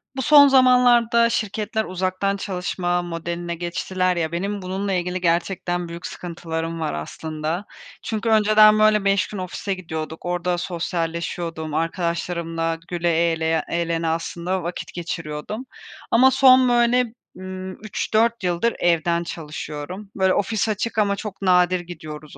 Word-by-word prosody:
Bu 265 - -2
son 285 0 +8
zamanlarda 245 -3 +5
şirketler 220 0 -2
uzaktan 185 +2 -1
çalışma 180 -2 -2
modeline 170 0 -4
geçtiler 180 +2 -1
ya, 160 -2 -1
benim 200 +4 -3
bununla 190 +2 -2
ilgili 180 0 -2
gerçekten 175 0 0
büyük 170 +1 -8
sıkıntılarım 165 -1 -5
var 160 - -2
aslında. 155 - -4 0.4
Çünkü 220 +1 -2
önceden, 215 0 +6
böyle, 215 -1 +4
5 195 0 +2
gün 210 - -7
ofise 185 +2 -4
gidiyorduk. 160 -3 -6
Orada 175 0 -1
sosyalleşiyordum. 170 -2 -3
Arkadaşlarımla 165 0 -2
güle 175 -1 -1 0.2
eğleye 160 -1 0
eğlene 170 -1 -1
aslında 170 +3 -2
vakit 175 +1 -5
geçiriyordum 170 - -5 0.5
ama 260 +3 +6
son, 255 -1 +6
böyle, 240 +1 +3 0.3
ımm, 185 0 -6
3-4 220 +1 0
yıldır 180 +6 +1
evden 170 0 +2
çalışıyorum. 160 +4 -7
Böyle, 190 -1 +3
ofis 220 +2 0
açık 215 +2 -2
ama 205 -2 +2
çok 200 -1 -7
nadir 180 -1 +3
gidiyoruz 155 -4 -9
180 Hz, 130 wpm, -22 LUFS, 170-210 Hz, 0.5 s, son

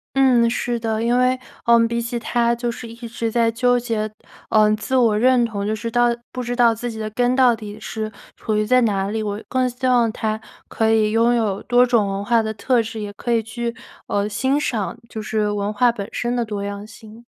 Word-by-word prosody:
嗯， 250 -4 +4
是 240 0 -1
的， 225 -1 -2
因 240 +2 +2
为， 255 0 +2 0.2
呃， 235 -1 +5
比 235 0 -2
起 235 0 -3
他 235 0 +1
就 235 0 -2
是 235 0 -6
一 230 - -9
直 230 0 -3
在 230 0 +2
纠 245 +2 +2
结， 220 -3 -2 0.4
呃， 215 -1 +4
自 220 +4 -6
我 225 -4 +3
认 250 +1 +4
同， 200 -3 -4
就 215 - 0
是 220 +2 -4
到 240 +1 +3 0.2
不 250 - -4
知 240 0 -3
道 240 -2 +4
自 240 +2 -4
己 220 - -8
的 215 0 -3
根 245 +2 +1
到 255 -2 +4
底 210 -1 -9
是 215 0 -5 0.2
处 220 - -3
于 215 - +1
在 255 +3 +4
哪 200 -4 +1
里， 220 0 -2
我 205 0 -3
更 255 -1 +1
希 255 +1 -3
望 240 -3 +3
他 220 -1 -3 0.3
可 220 0 +1
以 215 -1 +3
拥 230 +2 +3
有 215 -4 -1
多 245 0 +4
种 235 -4 +2
文 195 +1 -3
化 235 +1 +3
的 220 0 -3
特 235 +2 +1
质， 225 0 -6
也 205 -1 -5
可 240 +3 -4
以 230 -1 +3
去， 235 +1 -4 0.3
呃， 205 0 0
欣 265 +7 0
赏 220 -9 -2
就 220 - -6
是 210 0 -1
文 205 0 -2
化 240 +2 +3
本 200 -3 -6
身 240 0 -2
的 240 - +1
多 210 -3 -4
样 200 0 -5
性。 220 +1 -14
230 Hz, 250 characters per minute, -21 LUFS, 215-240 Hz, 0.4 s, 呃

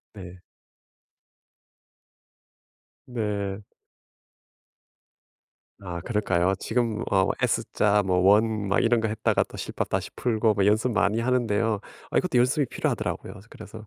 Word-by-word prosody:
네. 90 -2 -10 2.7
네. 105 -4 -3 2.2
아 90 -3 -5
그럴까요? 95 -3 0
지금 115 +1 -1
어 95 -1 +3
S자 105 0 +1
뭐 90 -1 +1
원 105 +1 +3
막 100 - +3
이런 115 0 +2
거 110 - -1
했다가 110 - +1
또 - - -12
실밥 - - -4
다시 - - -2
풀고 110 -2 +1
뭐 100 -1 +1
연습 110 +4 +2
많이 105 +2 +1
하는데요. 115 -4 0 0.3
아 - - +1
이것도 180 -9 +1
연습이 130 +4 +2
필요하더라고요. - - -3
그래서 110 -1 -11
105 Hz, 235 characters per minute, -25 LUFS, 100-115 Hz, 2.7 s, 어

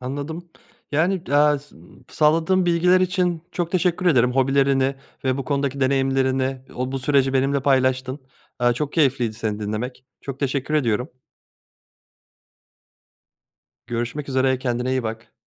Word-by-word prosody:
Anladım, 145 +6 -6 0.4
yani, 170 +5 +1
eee, 145 +1 +4
s 145 +1 -18 0.3
sağladığın 165 +4 +2
bilgiler 180 +2 +4
için 180 -3 0
çok 175 -2 -2
teşekkür 180 -1 +1
ederim 125 -7 +4
hobilerini 135 0 +2 0.3
ve 130 0 +1
bu 135 - -3
konudaki 140 0 -1
deneyimlerini. 135 0 +1
O 130 +1 -3
bu 135 - -2
süreci 135 0 +2
benimle 135 +1 +1
paylaştın, 130 -1 +1 0.4
eee, 120 0 +4
çok 145 +3 -3
keyifliydi 135 -7 +1
seni 110 -1 -3
dinlemek, 110 +5 -4 0.2
çok 135 -1 -7
teşekkür 140 +2 -1
ediyorum. 125 -2 0 2.8
Görüşmek 120 +5 -4
üzere, 130 -1 +1
kendine 125 -1 -2
iyi 130 -1 0
bak. 110 0 -6
135 Hz, 130 wpm, -22 LUFS, 130-150 Hz, 2.8 s, eee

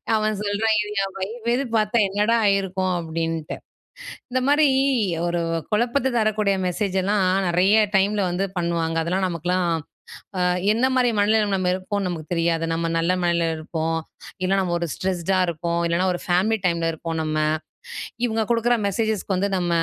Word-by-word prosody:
அவன் 215 -1 0
சொல்றான், 210 +2 +1
"இது 210 - -5
என் 195 -1 -5
வைஃப்கீது 235 +6 -1
பாத்தா, 215 +1 +2
என்னடா 210 +4 +2
ஆயிருக்கும்?" 190 -2 +1
அப்படின்ட்டு. 165 -1 -3 0.7
இந்த 255 - +1
மாரி, 290 +1 +5 0.6
ஒரு 175 0 0 0.3
குழப்பத்த 240 +4 +1
தரக்கூடிய 215 -2 +1
மெசேஜ்ஜலாம் 190 +1 0 0.2
நெறைய 185 +5 +4 0.2
டைம்ல 200 +1 +2
வந்து 180 +3 -1
பண்ணுவாங்க. 170 -1 -1
அதெல்லாம் 185 +3 0
நமக்கெல்லாம் 180 +1 -1 0.7
அ - - +1 0.3
என்ன 235 +4 +2
மாரி 250 -1 +3
மனநிலமையில 210 0 +2
நம்ம 185 -1 0
இருப்போம்னு 190 +1 -2
நமக்கு 165 -2 -6
தெரியாது. 165 -1 +1
நம்ம 165 0 -1
நல்ல 165 +2 +1
மனநிலையில 170 -2 +1
இருப்போம். 160 +1 -2 0.4
இல்லன்னா 190 +1 +2
நம்ம 180 -2 -1
ஒரு 170 - -2
ஸ்ட்ரெஸ்ட்டா 185 0 -1
இருப்போம். 170 +1 -2
இல்லனா 170 +2 +1
ஒரு 175 - -4
ஃபேமிலி 190 +5 +2
டைம்ல 170 -2 +1
இருப்போம் 165 +1 -5
நம்ம. 155 0 -2 0.9
இவுங்க 220 -1 0
குடுக்கற 235 +1 +2
மெசேஜஸ்க்கு 210 -2 -1
வந்து 200 +2 0
நம்ம 175 -1 -1
190 Hz, 150 wpm, -23 LUFS, 170-215 Hz, 0.9 s, மாரி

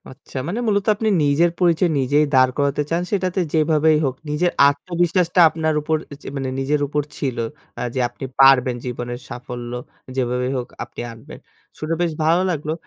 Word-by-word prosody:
আচ্ছা 130 0 -9
মানে 210 +7 -2
মূলত 205 -2 +1
আপনি 220 +1 -1 0.2
নিজের 150 +5 +3
পরিচয় 175 0 +3
নিজেই 145 +3 +3
দাঁড় 130 0 +5
করাতে 140 +1 +1
চান 170 +1 +1
সেটাতে 185 -2 0
যেভাবেই 155 0 +3
হোক, 130 -1 0 0.2
নিজের 175 +4 +1 0.2
আত্মবিশ্বাসটা 175 +4 +1
আপনার 160 -1 -1
উপর 155 +1 0 0.3
চে - - -8
মানে 135 -1 -2
নিজের 145 +2 0
উপর 150 +1 -1
ছিল, 130 -3 -2 0.4
আ - - -2
যে 130 - -1
আপনি 120 +2 -9 0.2
পারবেন 130 -2 +6
জীবনের 120 0 -5
সাফল্য 120 0 -7 0.4
যেভাবেই 125 +1 -1
হোক 125 - -4 0.2
আপনি - - -10
আনবেন। 115 +7 -12 0.4
শুনে 155 +2 -2
বেশ 170 -2 +1
ভালো 170 +3 +3
লাগলো 155 -2 -2
150 Hz, 170 wpm, -21 LUFS, 130-170 Hz, 0.4 s, পারবেন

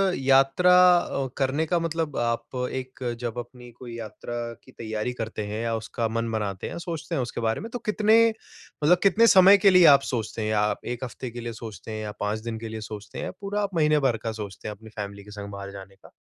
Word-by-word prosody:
यात्रा 135 +7 +4 0.2
अ, 140 -5 -2
करने 140 +4 +1
का 170 +2 +1
मतलब 165 -2 -2
आप 120 +2 -2 0.2
एक 130 0 -6 0.2
जब 120 -1 -4
अपनी 120 0 -10
कोई 120 0 -9
यात्रा 115 +1 -7 0.3
की 130 - -17
तैयारी 110 +1 -4
करते 110 -3 -4
हैं 105 +2 -4
या 115 -1 0
उसका 115 +1 -3
मन 115 +1 -2
बनाते 100 -4 -3
हैं, - - -6
सोचते 170 -1 -5
हैं 135 - 0
उसके 120 -1 -4
बारे 110 0 0
में, 225 - -6
तो 245 - -4
कितने 220 +2 +4 0.6
मतलब 175 +4 +6
कितने 225 +4 +5
समय 195 +1 +8
के 200 0 +5
लिए 180 -2 +7
आप - - +1
सोचते 110 -1 -3
हैं? 110 - -1
या 105 -1 +2
आप 105 0 -1
1 120 +1 -4
हफ़्ते 125 0 -6
के 120 - -7
लिए 115 0 -5
सोचते 110 -2 -9
हैं 110 0 -4
या 105 - -4
5 105 +1 -1
दिन 115 -1 -4
के 115 - -6
लिए 110 0 -6
सोचते 105 0 -8
हैं - - -3
या - - -4
पूरा 205 +1 -2
आप 200 -3 -3
महीने 150 -2 +3
भर 115 -3 0
का 115 - -1
सोचते 105 -1 -7
हैं 105 - -5
अपनी 110 +2 -14
फ़ैमिली 100 -2 -7
के 105 - -13
संग 100 0 -7
बाहर 100 0 -7
जाने 95 0 -11
का? - - -18
120 Hz, 240 wpm, -25 LUFS, 110-155 Hz, 0.6 s, समय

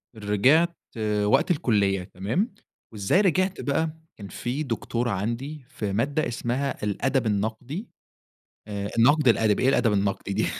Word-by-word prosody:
رجعت 130 - +3 0.5
وقت 105 - +3
الكُلّية 100 - +1
تمام، 115 - -2 0.4
وإزاي 105 - +2
رجعت 185 0 +1
بقى؟ 155 +2 -1 0.2
كان 100 - -8
في 125 +9 -3
دكتورة 120 -1 -2
عندي 120 +9 -3
في 105 -7 -4
مادة 140 +8 0
اسمها 120 +3 -2
الأدب 125 +5 0
النقدي، 110 - -2 0.8
آآ 100 -1 -4
النقد 145 +5 +5
الأدبي، 110 -2 +3
إيه 130 - +5
الأدب 115 -5 +3
النقدي 100 0 -1
دي؟! - - +1
120 Hz, 130 wpm, -25 LUFS, 105-145 Hz, 0.8 s, النقد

